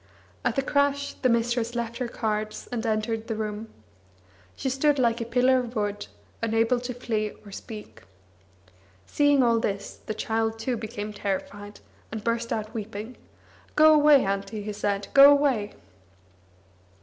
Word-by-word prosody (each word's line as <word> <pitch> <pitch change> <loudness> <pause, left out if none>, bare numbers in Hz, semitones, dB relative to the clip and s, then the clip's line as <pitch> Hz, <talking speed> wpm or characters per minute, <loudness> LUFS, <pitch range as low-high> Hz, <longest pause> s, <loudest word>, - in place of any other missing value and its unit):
At - - 0
the 275 - +1
crash 285 0 +1
the 255 - 0
mistress 235 0 0
left 235 -1 -3
her 250 - -1
cards, 215 -2 -3
and 235 -2 -2
entered 220 +1 -1
the 225 - -2
room. 215 0 -4 0.9
She - - -4
stood 280 +3 +2
like 235 -2 +1
a - - -2
pillar 255 +2 +3
of 245 -1 -5
wood, 205 -1 -2 0.3
unable 230 +2 +2
to 250 +1 -5
flee 215 -4 -2
or 200 - -11
speak. 210 +1 -9 1.0
Seeing 290 - +3
all 230 -1 +3
this, 200 -2 -3
the 215 - -3
child, 225 0 -1
too, 240 +3 -2
became 215 -1 -5
terrified, 205 +1 -5 0.3
and 220 -1 -5
burst 230 0 -1
out 215 0 -3
weeping: 220 +2 -6 0.6
"Go 310 +1 +7
away, 295 -4 +6
Auntie," 200 +2 -3
he 210 0 -4
said, 200 -1 -2
"go 280 0 +10
away!" 275 -8 +2
225 Hz, 150 wpm, -26 LUFS, 215-250 Hz, 1.0 s, go